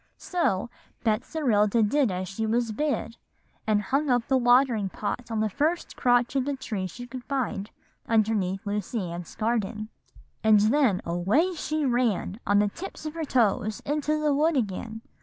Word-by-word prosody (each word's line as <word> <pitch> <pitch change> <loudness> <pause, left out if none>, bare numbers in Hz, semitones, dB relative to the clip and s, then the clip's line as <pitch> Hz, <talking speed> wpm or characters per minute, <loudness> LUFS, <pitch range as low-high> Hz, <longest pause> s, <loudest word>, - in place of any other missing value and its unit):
"So 240 - -1 0.3
Betserilda 225 -2 +2
did 280 +1 +2
as 185 0 -3
she 220 +3 -3
was 230 0 +1
bid, 260 -1 -2 0.5
and 210 -1 +2
hung 275 +7 0
up 245 -2 +2
the 265 - +2
watering 245 -4 +3
pot 235 +5 -4
on 225 -1 -1
the 220 - +2
first 310 - -1
crotch 245 +1 +2
of 270 - +2
the 285 0 -1
tree 210 -8 -4
she 245 +7 -9
could 255 0 -8
find 230 -7 -2 0.4
underneath 210 -3 +1
Lucy 205 -2 -2
Ann's 175 0 -7
Garden, 215 -1 -1 0.5
and 215 -1 +6
then 220 -1 +3
away 200 - +1
she 310 -2 -2
ran 240 -5 0
on 205 - +4
the 205 0 +3
tips 340 - -8
of 310 - -4
her 325 -1 -4
toes 220 -4 +1
into 300 +1 0
the 300 -1 +2
wood 305 +2 +2
again. 220 0 -3
230 Hz, 165 wpm, -26 LUFS, 205-275 Hz, 0.5 s, and